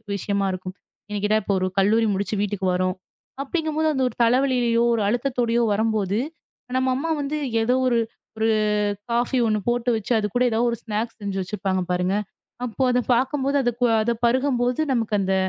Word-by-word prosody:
விஷயமா 200 0 -1
இருக்கும். 185 0 -6 0.4
எனக்கிட்ட 210 +1 +1
இப்போ 200 - 0
ஒரு 185 - 0
கல்லூரி 220 +4 +3
முடிச்சு 200 +2 -2
வீட்டுக்கு 205 -2 -2
வரும் 185 +1 0 0.5
அப்படிங்கும் 315 +2 -2
போது 315 0 +2 0.2
ஒரு - - -14
தலைவலையோ, 245 -1 +2
ஒரு 225 - 0
அழுத்தத்தோட 240 0 0 0.2
வரும்போது 215 -2 0 0.6
நம்ம 260 0 +1
அம்மா 320 +5 -2
வந்து 290 +2 -2 0.2
ஏதோ 240 +3 +2
ஒரு 240 - +2 0.4
ஒரு 220 - +1 0.6
காஃப்பியோ 240 +1 +1
ஒண்ணு 215 -1 +1
போட்டு 240 0 0
வச்சு, 220 +1 -4
அது 210 - -1
கூட 250 - +3
ஏதாவது 235 +2 +2
ஒரு 235 - -3
ஸ்நாக்ஸ் 225 +1 -3
செஞ்சு 195 -1 -3
வச்சுருப்பாங்க 190 -1 -2
பாருங்க. 180 +2 +1 0.5
அப்போ 245 +3 -2
அத 250 - +2
பாக்கும்போது 270 +3 +1
அது 245 - +2 0.3
அத 235 - +1
பருகும்போது 250 +1 +1
நமக்கு 225 -3 -1
அந்த 190 0 0
230 Hz, 165 wpm, -23 LUFS, 205-250 Hz, 0.6 s, கல்லூரி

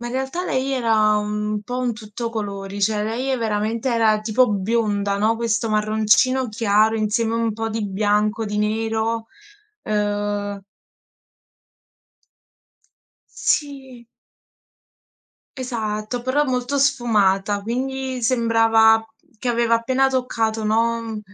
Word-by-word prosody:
ma 240 - -5
in 240 - -5
realtà 265 +8 -2
lei 265 -2 -1
era 220 -4 +2
un 210 0 -2
po' 245 +4 -4
un 250 -2 0
tutto 220 +1 -6
colori, 200 -2 -5
cioè 210 +1 +1
lei 255 +5 -1
veramente 220 +2 -1
era 220 -2 +3
tipo 225 +4 +2
bionda, 205 -1 0
no, 220 +2 +2
questo 225 -1 -1
marroncino 215 +4 +2
chiaro 215 0 +2
insieme 220 +1 0
a - - 0
un 230 -1 0
po' 225 +1 -3
di 220 -1 -3
bianco, 210 +2 0
di 210 0 -3
nero. 225 +1 -1 0.6
Uhm 205 -1 -2 2.8
Sì. 265 -5 -2 1.5
Esatto, 230 -2 -3
però 265 +4 +1
molto 260 +1 -1
sfumata, 210 -8 +2
quindi 260 +3 -3
sembrava 225 -2 +4 0.3
che 250 - -3
aveva 235 -1 +2
appena 260 +4 +2
toccato, 225 -4 -1
no, 230 +2 +1
mhmm, 220 -2 -5
225 Hz, 120 wpm, -21 LUFS, 210-245 Hz, 2.8 s, sembrava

